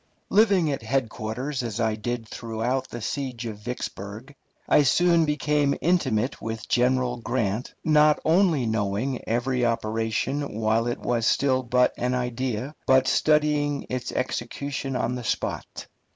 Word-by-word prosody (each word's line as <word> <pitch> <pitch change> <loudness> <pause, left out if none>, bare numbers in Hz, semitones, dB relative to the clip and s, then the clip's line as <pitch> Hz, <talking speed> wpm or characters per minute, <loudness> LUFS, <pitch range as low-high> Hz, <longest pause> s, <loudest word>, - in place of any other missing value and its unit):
Living 195 -7 +4
at 135 - -3
headquarters 125 +2 -2
as 115 -2 -4
I 110 -1 +1
did 115 +1 -4
throughout 120 +4 -3
the 120 -2 -7
siege 130 -3 -3
of 110 -3 -6
Vicksburg, 110 +1 -6 0.3
I - - +5
soon 170 +4 +4
became 150 -1 +1
intimate 135 -9 +1
with 110 -1 -5
General 125 0 +2
Grant, 115 -2 -2
not 150 -1 +4
only 165 -5 +3
knowing 110 +4 -1
every 125 +2 0
operation 115 +3 -1
while 110 +1 +1
it 120 - -1
was 120 -2 0
still 130 -2 +2
but 125 0 +2
an 125 +1 0
idea, 125 +1 -2
but 130 0 +5
studying 150 -1 +2
its 125 -1 -3
execution 135 +2 -3
on 125 0 0
the 125 -1 -5
spot. - - -3
125 Hz, 135 wpm, -25 LUFS, 115-140 Hz, 0.3 s, I